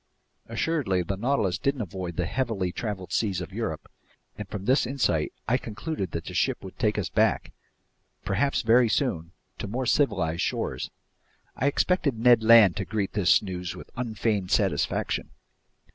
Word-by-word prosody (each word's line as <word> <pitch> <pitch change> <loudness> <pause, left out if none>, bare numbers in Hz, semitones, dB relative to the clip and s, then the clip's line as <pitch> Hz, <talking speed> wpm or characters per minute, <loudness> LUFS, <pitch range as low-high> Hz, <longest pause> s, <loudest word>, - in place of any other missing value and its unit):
Assuredly, 125 - 0
the 95 +3 -3
Nautilus 105 -4 0
didn't 140 -3 0
avoid 90 -2 -6
the 90 - -1
heavily 105 -5 -1
traveled 95 -4 -5
seas 100 -5 0
of 90 - -7
Europe, - - -4 0.5
and 105 -2 -7
from 100 -2 -6
this 130 0 +3
insight 120 - 0 0.2
I 125 +3 +3
concluded 110 - -4
that 85 - -5
the - - -7
ship - - 0
would - - -10
take - - +1
us - - -1
back—perhaps 135 +9 -2
very 115 +1 +5
soon—to 95 - -3
more 125 +6 -2
civilized 90 - +1
shores. - - -2 0.7
I 135 - 0
expected 145 -3 +1
Ned 120 0 +5
Land 110 -5 +7
to 95 - -2
greet 105 -1 -2
this 100 -1 +4
news 90 -3 -5
with - - -11
unfeigned 110 -5 -1
satisfaction. - - 0
105 Hz, 150 wpm, -26 LUFS, 95-125 Hz, 0.7 s, Land